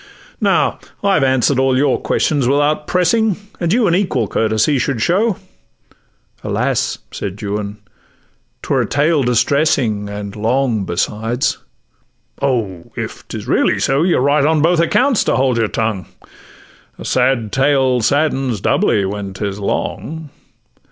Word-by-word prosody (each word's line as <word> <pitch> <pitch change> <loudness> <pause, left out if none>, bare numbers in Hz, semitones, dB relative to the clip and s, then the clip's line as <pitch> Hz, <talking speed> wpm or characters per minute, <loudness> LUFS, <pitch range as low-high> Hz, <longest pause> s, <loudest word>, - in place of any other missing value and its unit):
Now - - +2 0.2
I 200 0 +3
have 155 - +2
answer'd 130 0 +2
all 130 -1 +2
your 140 -1 +1
questions 145 -5 0
without 145 +2 +1
pressing, 195 +4 +2 0.2
And 170 -2 0
you 235 +2 +3
an 170 - +2
equal 170 - 0
courtesy 110 +7 +1
should 130 -2 -1
show.' 195 - +1 1.1
'Alas!' - - -1
said 100 0 -6
Juan, 105 0 -4 0.9
''twere - - +1
a - - -2
tale 150 +2 +2
distressing, 125 -4 +1
And 100 -1 -6
long 115 -1 0
besides.'—'Oh! 110 0 -4
if - - -6
'tis - - -7
really - - +2
so, 135 +2 +1
You're 170 -6 +2
right 140 +2 +3
on 155 0 +2
both 170 +1 +3
accounts 245 - +2
to - - +1
hold 130 -2 +1
your 110 - +2
tongue; 105 -5 -2 0.9
A - - -9
sad 125 -4 +1
tale 135 -2 +2
saddens 135 -3 +1
doubly, 100 +2 +1
when 100 0 -5
'tis 100 0 -4
long. 155 +8 -4
130 Hz, 135 wpm, -17 LUFS, 110-150 Hz, 1.1 s, I